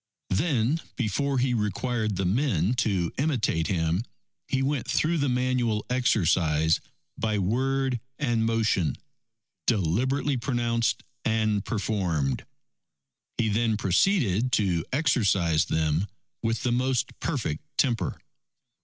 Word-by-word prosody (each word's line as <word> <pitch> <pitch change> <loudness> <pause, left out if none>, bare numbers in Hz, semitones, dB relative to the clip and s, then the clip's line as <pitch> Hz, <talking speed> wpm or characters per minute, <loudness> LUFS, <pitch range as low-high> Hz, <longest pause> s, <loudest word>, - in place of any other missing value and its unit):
Then 135 - +1 0.2
before 135 +4 0
he 125 0 +2
required 110 0 -1
the 95 - -1
men 105 - +1
to 95 -8 0
imitate 120 - +1
him, 85 +2 0 0.4
he 135 0 0
went 140 -2 -1
through 165 +1 +1
the 140 -1 +1
manual 125 -3 0
exercise 80 -10 +2 0.4
by 110 -1 0
word 130 +5 0 0.2
and 120 -6 +1
motion, 110 - +1 0.7
deliberately 125 - +1
pronounced 120 -2 0 0.2
and 110 -2 +1
performed. 90 - -1 0.9
He 115 - +1
then 110 +1 +1
proceeded 110 - +2
to 90 -6 +2
exercise 100 - +2
them 80 +4 0 0.3
with 115 -1 -1
the 125 - +1
most 125 0 0
perfect 110 - -2
temper. 120 -5 +1
115 Hz, 110 wpm, -27 LUFS, 95-130 Hz, 0.9 s, he